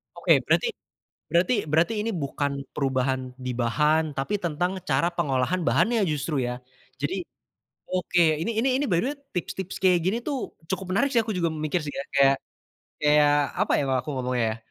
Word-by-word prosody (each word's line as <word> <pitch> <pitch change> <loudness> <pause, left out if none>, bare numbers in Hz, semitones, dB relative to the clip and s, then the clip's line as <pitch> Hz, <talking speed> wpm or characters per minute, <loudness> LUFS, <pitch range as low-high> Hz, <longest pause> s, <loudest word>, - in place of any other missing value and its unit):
Oke - - 0
berarti - - +2 0.6
berarti 175 +8 +3
berarti 165 +9 +2
ini 225 +2 -1
bukan 140 -2 -2 0.2
perubahan 130 -2 -1
di 130 -1 -5
bahan, 150 +5 +1
tapi 135 +10 -2
tentang 175 +3 -1
cara 170 - +2
pengolahan 150 +1 0
bahannya 225 -3 +3
justru 145 -1 -1
ya. 125 +1 -5 0.4
Jadi 175 +6 -2 0.7
oke 180 -1 0 0.2
ini 230 - -1
ini 265 +3 +2
ini 290 - +1
by 175 -4 +2
the 250 - 0
way 295 - -7 0.2
tips-tips 185 +1 -4
kayak 180 -2 +5
gini 205 +5 +1
tuh 280 -4 -3 0.2
cukup 190 0 -2
menarik 280 +8 +2
sih 240 - +4
aku 220 - -3
juga 170 -2 +1
mikir 155 +2 -1
sih 145 - -4
ya 140 - -3
kayak 135 0 +5 0.7
kayak 150 0 +4
kayak 145 -1 +5 0.3
apa - - +2
ya - - +1
kalau 130 -1 +2
aku 150 - -6
ngomongnya 125 -2 0
ya. - - -9
155 Hz, 185 wpm, -25 LUFS, 135-185 Hz, 0.7 s, kayak